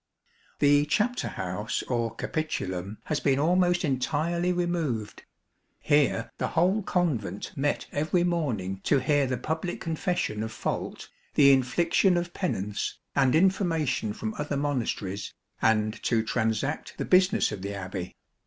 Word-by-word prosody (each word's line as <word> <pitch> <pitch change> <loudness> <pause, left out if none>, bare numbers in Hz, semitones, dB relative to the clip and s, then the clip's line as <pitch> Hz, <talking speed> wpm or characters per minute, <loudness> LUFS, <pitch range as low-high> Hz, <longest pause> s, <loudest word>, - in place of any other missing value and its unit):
The 145 0 +4
chapter 225 +10 +1
house 95 +3 -3
or 115 -2 -2
capitulum, 100 - -3
has 150 - -1
been 135 -2 +2
almost 175 +3 +3
entirely 155 +6 0
removed. 165 -12 -2 0.5
Here 145 -1 +2
the - - 0
whole 185 +6 +3
Convent 135 - -1
met 145 +1 0
every 155 +4 +1
morning 120 - -1
to 145 - +4
hear 145 +1 +2
the 125 -1 -1
public 160 +6 -3
confession 165 - -2
of 110 0 -3
fault, - - -4 0.3
the 140 -2 +7
infliction 170 +8 +3
of 175 0 -3
penance, 105 - -2 0.2
and 135 0 +4
information 165 - +2
from 110 0 -4
other 145 -1 -2
monasteries, 115 -8 -2 0.3
and 110 0 +2
to 115 -2 +1
transact 115 +5 -1
the - - -2
business 185 +1 +4
of 105 -3 -5
the 100 +1 -4
Abbey. 95 -2 -5
145 Hz, 135 wpm, -27 LUFS, 110-170 Hz, 0.5 s, the